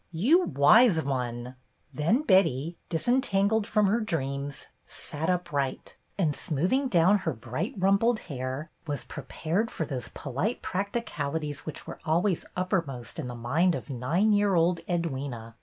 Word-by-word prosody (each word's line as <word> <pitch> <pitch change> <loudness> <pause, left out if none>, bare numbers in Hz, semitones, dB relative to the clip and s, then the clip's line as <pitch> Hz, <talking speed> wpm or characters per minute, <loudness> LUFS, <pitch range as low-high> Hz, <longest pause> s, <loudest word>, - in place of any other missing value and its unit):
"You, 265 - +4
Wise 160 - +5
One!" 125 -2 -3 0.4
Then 170 - +2
Betty, 170 - +3
disen 240 +10 +2
tangled 205 -1 +1
from 210 -2 +3
her 215 +4 +2
dreams, 140 -7 -3 0.2
sat 155 +3 -4
upright, 145 -7 -2 0.2
and, 160 -7 +1
smoothing 180 - 0
down 190 0 +4
her 160 -4 -2
bright 130 - -4
rumpled 200 +5 +3
hair, 130 +1 -5 0.2
was 145 -1 -3
prepared 190 +8 -2
for 160 - -3
those 130 -4 -4
polite 150 - -3
practicalities 160 -8 -3
which 155 - -6
were - - -8
always 170 +3 +1
uppermost 165 - -2
in 140 - -3
the 125 - -6
mind 155 +10 +2
of - - -6
nine 165 - +2
year 205 -2 +3
old 170 +1 +3
Edwyna. 135 -9 -3
165 Hz, 140 wpm, -28 LUFS, 140-200 Hz, 0.4 s, Wise